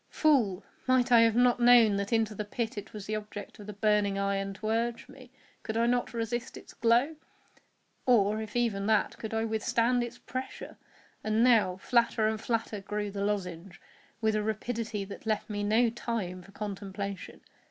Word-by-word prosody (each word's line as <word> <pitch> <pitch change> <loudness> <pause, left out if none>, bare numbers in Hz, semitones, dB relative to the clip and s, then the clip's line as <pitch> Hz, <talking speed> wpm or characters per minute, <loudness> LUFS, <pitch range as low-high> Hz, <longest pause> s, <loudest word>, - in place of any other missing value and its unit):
Fool! 230 - +2 0.2
might 255 -1 +3
I 235 - +8
have 225 -1 +4
not 245 0 +4
known 240 -3 +6
that 200 0 -3
into 225 -2 +1
the 210 - -4
pit 225 +2 -3
it 205 -1 -7
was 210 -2 -8
the 215 - -4
object 210 0 -7
of 205 - -10
the 210 - -6
burning 205 -1 +1
iron 195 0 -1
to 215 +2 -4
urge 230 +1 -1
me? 255 -2 -14 0.3
Could 220 0 -4
I 230 - +3 0.3
resist 235 +1 -3
its - - -13
glow? 240 +7 +2 0.9
or, 215 -3 +3
if 215 0 -8
even 215 -5 0
that, 220 -1 +2
could 220 - -5
I 225 0 0
withstand 230 +2 +1
its 240 - -7
pressure? 255 +1 -7 0.5
And 215 +1 +2
now, 220 -7 +4
flatter 230 +1 +2
and 220 0 -2
flatter 225 -3 -2
grew 205 +1 -3
the 200 0 -3
lozenge, 190 -3 -3 0.4
with 220 -1 +2
a 215 - +1
rapidity 220 -1 -3
that 200 +3 -10
left 215 0 -1
me 205 0 -2
no 220 +3 +3
time 215 -6 -4
for 195 - -16
contemplation. 200 -2 -6
215 Hz, 180 wpm, -29 LUFS, 205-235 Hz, 0.9 s, I